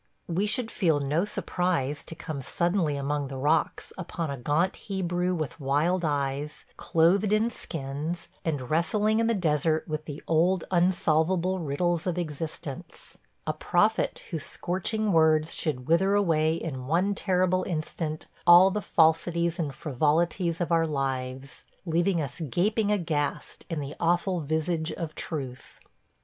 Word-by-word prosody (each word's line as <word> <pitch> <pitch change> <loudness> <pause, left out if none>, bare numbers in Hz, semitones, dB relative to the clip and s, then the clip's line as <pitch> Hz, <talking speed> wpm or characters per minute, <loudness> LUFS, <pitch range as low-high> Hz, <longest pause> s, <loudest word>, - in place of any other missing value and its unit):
We 185 +5 0
should 225 +1 0
feel 165 -7 +2
no 150 +6 0
surprise 170 -8 -1
to 165 - -7
come 155 -3 -5
suddenly 170 +1 0
among 140 0 -1
the 135 0 -6
rocks 150 +4 0
upon 170 -3 -4
a 140 - -4
gaunt 150 +9 +1
Hebrew 180 -2 -1
with 155 -2 -4
wild 155 +6 +1
eyes, 145 -1 -2
clothed 185 +5 +2
in 220 +2 +2
skins, 155 -1 -5 0.2
and 145 -6 -3
wrestling 210 +7 +2
in 230 - +2
the 230 - +2
desert 160 -3 +1
with 155 -1 -4
the 145 -1 -7
old 170 +3 +2
unsolvable 180 +1 +2
riddles 170 +3 -1
of 180 -1 -1
existence 160 0 -6
– - - -44
a 155 - 0
prophet 200 +8 +1
whose 160 -3 -3
scorching 205 +4 -1
words 160 -1 +4
should 130 -6 -3
wither 190 +5 +3
away 160 -5 +2
in 130 -6 -5
one 180 +7 +2
terrible 185 -1 +1
instant 155 -2 -3 0.2
all 175 +2 +9
the 210 +2 -2
falsities 170 0 +2
and 145 -5 -2
frivolities 160 +4 0
of 175 -1 -2
our 165 -1 +3
lives, 135 -2 -3 0.2
leaving 170 +2 +1
us 145 +2 -5
gaping 205 - +1
aghast 160 -7 -2
in 165 -3 -2
the 140 0 -5
awful 175 +2 +1
visage 160 +2 -1
of 165 -3 -5
Truth. 135 -7 -6
165 Hz, 145 wpm, -27 LUFS, 150-180 Hz, 0.2 s, all